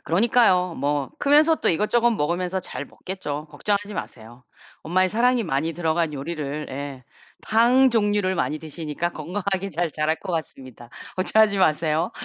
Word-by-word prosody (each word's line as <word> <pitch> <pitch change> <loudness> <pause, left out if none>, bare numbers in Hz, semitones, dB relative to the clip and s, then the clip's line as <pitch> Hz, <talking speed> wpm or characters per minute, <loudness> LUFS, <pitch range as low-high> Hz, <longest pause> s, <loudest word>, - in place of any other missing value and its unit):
그러니까요. 185 -2 +3
뭐 145 0 -1
크면서 300 +3 +5
또 - - 0
이것저것 230 +7 +2
먹으면서 180 0 -1
잘 - - -6
먹겠죠. 155 -5 -6
걱정하지 205 +6 -2
마세요. 120 +2 -8 0.4
엄마의 185 +3 +2
사랑이 245 +2 +2
많이 160 +2 -1
들어간 165 -1 0
요리를 150 0 -4
예 135 -1 -6 0.4
탕 245 +4 +4
종류를 205 -4 +1
많이 155 -3 -1
드시니까 160 +1 -4
건강하게 190 +4 -3
잘 170 -1 -2
자랄 155 +1 0
것 180 - -6
같습니다. 130 -7 -6 0.3
걱정하지 200 +2 +3
마세요. 160 0 +1
175 Hz, 360 characters per minute, -23 LUFS, 150-205 Hz, 0.4 s, 크면서